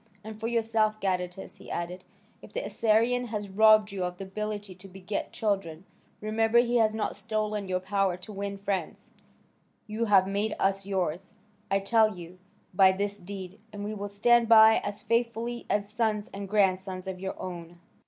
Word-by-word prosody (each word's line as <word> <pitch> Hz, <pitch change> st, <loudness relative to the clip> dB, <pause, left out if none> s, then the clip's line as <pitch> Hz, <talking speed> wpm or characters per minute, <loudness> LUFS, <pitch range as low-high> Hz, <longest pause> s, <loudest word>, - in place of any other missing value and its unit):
And 215 Hz, 0 st, -9 dB
for 225 Hz, -, -2 dB
yourself, 225 Hz, -2 st, +1 dB
Gadatas," 185 Hz, -1 st, -3 dB
he -, -, -13 dB
added, 175 Hz, +2 st, -4 dB, 0.4 s
"if -, -, -13 dB
the -, -, -3 dB
Assyrian 230 Hz, +3 st, +2 dB
has 210 Hz, -3 st, -4 dB
robbed 215 Hz, +1 st, +5 dB
you 195 Hz, -2 st, -3 dB
of 180 Hz, 0 st, -3 dB
the 195 Hz, -, -6 dB
ability 205 Hz, 0 st, -5 dB
to 185 Hz, +2 st, -14 dB
beget 190 Hz, +2 st, -5 dB
children, 195 Hz, -5 st, -2 dB, 0.4 s
remember 225 Hz, +2 st, +1 dB
he 240 Hz, 0 st, +4 dB
has 220 Hz, -1 st, +3 dB
not 220 Hz, -, -2 dB
stolen 215 Hz, -2 st, -2 dB
your 185 Hz, 0 st, 0 dB
power 190 Hz, -1 st, 0 dB
to 185 Hz, +4 st, -10 dB
win 200 Hz, 0 st, -4 dB
friends; 195 Hz, -1 st, -4 dB, 0.7 s
you 220 Hz, +2 st, -2 dB
have 195 Hz, -3 st, +5 dB
made 205 Hz, +2 st, -1 dB
us 195 Hz, 0 st, 0 dB
yours, 185 Hz, 0 st, -2 dB, 0.3 s
I 195 Hz, 0 st, +2 dB
tell 215 Hz, -1 st, +3 dB
you, 175 Hz, +1 st, -11 dB, 0.3 s
by 190 Hz, 0 st, +6 dB
this 200 Hz, +1 st, -2 dB
deed, 190 Hz, +1 st, -8 dB
and 205 Hz, -1 st, -7 dB
we 210 Hz, +1 st, -3 dB
will 205 Hz, -1 st, -5 dB
stand 230 Hz, +3 st, +3 dB
by 220 Hz, 0 st, +8 dB
as 205 Hz, 0 st, -5 dB
faithfully 235 Hz, +1 st, -1 dB
as 205 Hz, -1 st, 0 dB
sons 215 Hz, -1 st, -1 dB
and 200 Hz, 0 st, -6 dB
grandsons 190 Hz, -2 st, +1 dB
of 190 Hz, -1 st, -5 dB
your 190 Hz, 0 st, -5 dB
own." 175 Hz, -1 st, -7 dB
205 Hz, 175 wpm, -28 LUFS, 190-220 Hz, 0.7 s, by